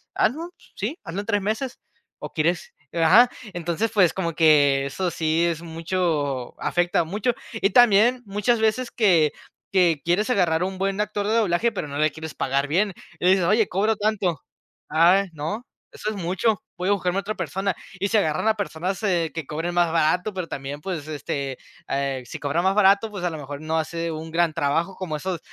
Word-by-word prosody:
"Hazlo, 320 Hz, +9 st, 0 dB, 0.3 s
sí, 235 Hz, -, -3 dB
hazlo 165 Hz, +4 st, -5 dB
en 205 Hz, -, -4 dB
3 205 Hz, -2 st, +1 dB
meses, 220 Hz, +5 st, -2 dB, 0.4 s
o -, -, -8 dB
quieres" 485 Hz, 0 st, -1 dB, 0.2 s
ajá. 180 Hz, +9 st, +6 dB, 0.3 s
Entonces, 175 Hz, +5 st, -1 dB
pues, 195 Hz, -6 st, +4 dB
como 170 Hz, -3 st, -2 dB
que 145 Hz, -4 st, +4 dB
eso 175 Hz, +7 st, -2 dB
sí 165 Hz, 0 st, +1 dB
es 165 Hz, -2 st, -1 dB
mucho, 160 Hz, -6 st, -2 dB
afecta 175 Hz, 0 st, +1 dB
mucho. 205 Hz, +8 st, 0 dB, 0.2 s
Y 220 Hz, -3 st, 0 dB
también 240 Hz, +2 st, +5 dB
muchas 210 Hz, +4 st, +1 dB
veces 220 Hz, +3 st, +1 dB
que 175 Hz, -9 st, +3 dB, 0.4 s
que 175 Hz, -6 st, +3 dB
quieres 180 Hz, +7 st, +1 dB
agarrar 175 Hz, -7 st, +2 dB
un 190 Hz, +1 st, -3 dB
buen 195 Hz, +2 st, 0 dB
actor 210 Hz, -1 st, -2 dB
de 215 Hz, -, +1 dB
doblaje, 220 Hz, 0 st, +2 dB
pero 195 Hz, -8 st, -4 dB
no 140 Hz, 0 st, -6 dB
le 155 Hz, +1 st, +2 dB
quieres 160 Hz, +1 st, -8 dB
pagar 140 Hz, +1 st, 0 dB
bien, 190 Hz, +7 st, +1 dB, 0.3 s
y 180 Hz, -, +3 dB
dices: 190 Hz, -2 st, +4 dB
"Oye, 210 Hz, +3 st, +3 dB
cobro 210 Hz, +4 st, +1 dB
tanto", 205 Hz, -6 st, -1 dB, 0.5 s
"Ay, 180 Hz, +5 st, +4 dB
no, 160 Hz, +11 st, -5 dB, 0.2 s
eso 210 Hz, -, -4 dB
es 215 Hz, -, -4 dB
mucho, 190 Hz, +4 st, 0 dB, 0.2 s
voy 180 Hz, +2 st, 0 dB
a -, -, +4 dB
buscarme 185 Hz, -1 st, 0 dB
a -, -, -2 dB
otra 215 Hz, +2 st, -4 dB
persona". 195 Hz, -1 st, -2 dB, 0.2 s
Y 200 Hz, -, +1 dB
se 220 Hz, -, +2 dB
agarran 160 Hz, 0 st, +1 dB
a 220 Hz, -, +3 dB
personas, 190 Hz, -2 st, -3 dB
eh, 170 Hz, -6 st, +1 dB
que 165 Hz, -3 st, -4 dB
cobren 165 Hz, +5 st, -3 dB
más 175 Hz, -2 st, +3 dB
barato, 170 Hz, +5 st, +1 dB
pero 185 Hz, -3 st, -4 dB
también, 140 Hz, 0 st, -6 dB
pues 165 Hz, -4 st, -5 dB
este, 140 Hz, -3 st, -4 dB, 0.3 s
eh, 135 Hz, -1 st, -2 dB
si -, -, -8 dB
cobran 145 Hz, +4 st, -1 dB
más 190 Hz, +1 st, +3 dB
barato, 205 Hz, +2 st, +4 dB
pues, 200 Hz, -4 st, -6 dB
a 175 Hz, -, +1 dB
lo 160 Hz, -, -6 dB
mejor 145 Hz, 0 st, -7 dB
no 160 Hz, +1 st, -1 dB
hace 165 Hz, +1 st, -2 dB
un 160 Hz, +1 st, -6 dB
gran 170 Hz, 0 st, +2 dB
trabajo, 165 Hz, +6 st, 0 dB
como 175 Hz, -5 st, -4 dB
esos 180 Hz, +2 st, -3 dB
180 Hz, 195 wpm, -24 LUFS, 160-205 Hz, 0.5 s, ajá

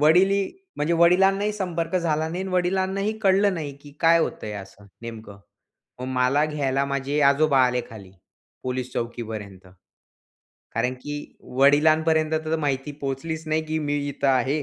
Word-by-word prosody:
वडील 175 Hz, +6 st, +5 dB
ही 200 Hz, -1 st, +1 dB, 0.3 s
म्हणजे 150 Hz, +3 st, 0 dB
वडिलांनाही 195 Hz, +4 st, +4 dB
संपर्क 180 Hz, -4 st, -3 dB
झाला 160 Hz, -3 st, 0 dB
नाही 175 Hz, +3 st, -3 dB
आणि 190 Hz, -1 st, -5 dB
वडिलांनाही 190 Hz, +3 st, 0 dB
कळलं 195 Hz, 0 st, +4 dB
नाही, 155 Hz, -4 st, -4 dB
की 145 Hz, 0 st, -15 dB
काय 165 Hz, 0 st, +5 dB
होतं 165 Hz, -, -2 dB
आहे 105 Hz, -, -5 dB
असं 100 Hz, +1 st, -11 dB, 0.2 s
नेमकं? 110 Hz, -3 st, -9 dB, 0.6 s
मग -, -, -4 dB
मला 130 Hz, +4 st, +3 dB
घ्यायला 140 Hz, -3 st, 0 dB
माझे 140 Hz, +1 st, -1 dB
आजोबा 140 Hz, 0 st, +3 dB
आले 125 Hz, 0 st, 0 dB
खाली, 100 Hz, -4 st, -11 dB, 0.5 s
पोलिस 125 Hz, 0 st, -3 dB
चौकीपर्यंत. 110 Hz, -5 st, -5 dB, 1.1 s
कारण 125 Hz, +3 st, 0 dB
की 145 Hz, -, -5 dB, 0.4 s
वडिलांपर्यंत 155 Hz, +3 st, +4 dB
तर 160 Hz, +1 st, 0 dB
माहिती 145 Hz, -1 st, -2 dB
पोहोचलीच 155 Hz, +4 st, -4 dB
नाही 155 Hz, +1 st, +1 dB
की 155 Hz, 0 st, -1 dB
मी 145 Hz, -1 st, -1 dB
इथे 140 Hz, 0 st, -2 dB
आहे. 135 Hz, +3 st, +2 dB
150 Hz, 150 wpm, -24 LUFS, 130-170 Hz, 1.1 s, वडील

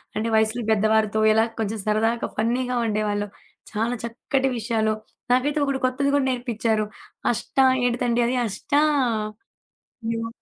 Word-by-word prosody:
అంటే 215 Hz, +2 st, -1 dB
వయసులు 220 Hz, +2 st, +2 dB
పెద్దవారితో 215 Hz, 0 st, +2 dB
ఎలా 220 Hz, +1 st, +4 dB, 0.2 s
కొంచెం 220 Hz, +1 st, -2 dB
సరదాగా, 225 Hz, +2 st, +1 dB
ఫన్నీగా 250 Hz, +2 st, 0 dB
ఉండేవాళ్ళు 210 Hz, -1 st, -1 dB, 0.4 s
చాలా 225 Hz, +3 st, -1 dB
చక్కటి 265 Hz, +3 st, -1 dB
విషయాలు. 220 Hz, -1 st, 0 dB, 0.4 s
నాకైతే 290 Hz, +4 st, +2 dB
ఒకడు 275 Hz, -1 st, -1 dB
కొత్తది 280 Hz, +2 st, 0 dB
కూడా 285 Hz, -2 st, +2 dB
నేర్పిచ్చారు. 230 Hz, -4 st, 0 dB, 0.5 s
అష్ట 240 Hz, -, -6 dB, 0.3 s
ఏటితండి 240 Hz, 0 st, +1 dB
అది 255 Hz, -, 0 dB
అష్ట? 205 Hz, +6 st, -9 dB, 1.4 s
ఏమో 230 Hz, 0 st, -3 dB
230 Hz, 120 wpm, -24 LUFS, 215-250 Hz, 1.4 s, ఎలా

